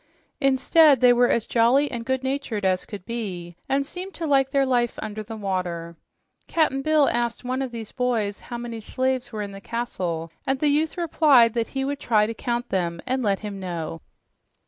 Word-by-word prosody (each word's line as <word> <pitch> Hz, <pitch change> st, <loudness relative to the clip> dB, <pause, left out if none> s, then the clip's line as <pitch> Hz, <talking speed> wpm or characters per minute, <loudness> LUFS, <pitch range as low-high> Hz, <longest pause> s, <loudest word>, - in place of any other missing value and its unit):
Instead, 275 Hz, +2 st, +5 dB
they 245 Hz, 0 st, +6 dB
were 245 Hz, 0 st, +4 dB
as 230 Hz, -, +1 dB
jolly 250 Hz, +5 st, +3 dB
and 235 Hz, -2 st, -5 dB
good 260 Hz, 0 st, 0 dB
natured 265 Hz, -6 st, -2 dB
as 185 Hz, -1 st, +1 dB
could 200 Hz, -3 st, -8 dB
be 185 Hz, -7 st, -5 dB
and 275 Hz, +1 st, +1 dB
seemed 370 Hz, +5 st, -7 dB
to 335 Hz, -, -4 dB
like 270 Hz, -3 st, +3 dB
their 275 Hz, 0 st, +2 dB
life 245 Hz, -2 st, +1 dB
under 215 Hz, 0 st, -5 dB
the 220 Hz, +1 st, -7 dB
water. 180 Hz, -4 st, -3 dB, 0.5 s
Cap'n 310 Hz, -5 st, +1 dB
Bill 305 Hz, -1 st, +3 dB
asked 240 Hz, 0 st, -1 dB
one 255 Hz, +1 st, -2 dB
of 265 Hz, -, -2 dB
the 230 Hz, -2 st, -6 dB
boys 230 Hz, -5 st, 0 dB
how 240 Hz, -, -4 dB
many 235 Hz, -1 st, -6 dB
slaves 260 Hz, +2 st, -1 dB
were 215 Hz, -2 st, -3 dB
in 200 Hz, -, -6 dB
the 195 Hz, 0 st, -10 dB
castle, 180 Hz, -9 st, -3 dB, 0.2 s
and 270 Hz, 0 st, +1 dB
the 295 Hz, +2 st, +2 dB
youth 305 Hz, +4 st, +1 dB
replied 290 Hz, -9 st, +4 dB
that 230 Hz, -1 st, -1 dB
he 270 Hz, -, 0 dB
would 280 Hz, 0 st, -3 dB
try 215 Hz, -6 st, +3 dB
to 225 Hz, -, -3 dB
count 240 Hz, +1 st, -3 dB
them 170 Hz, -3 st, -1 dB
and 260 Hz, +1 st, -1 dB
let 200 Hz, -4 st, 0 dB
him 205 Hz, -2 st, -6 dB
know. 165 Hz, -3 st, -5 dB
240 Hz, 200 wpm, -24 LUFS, 205-270 Hz, 0.5 s, they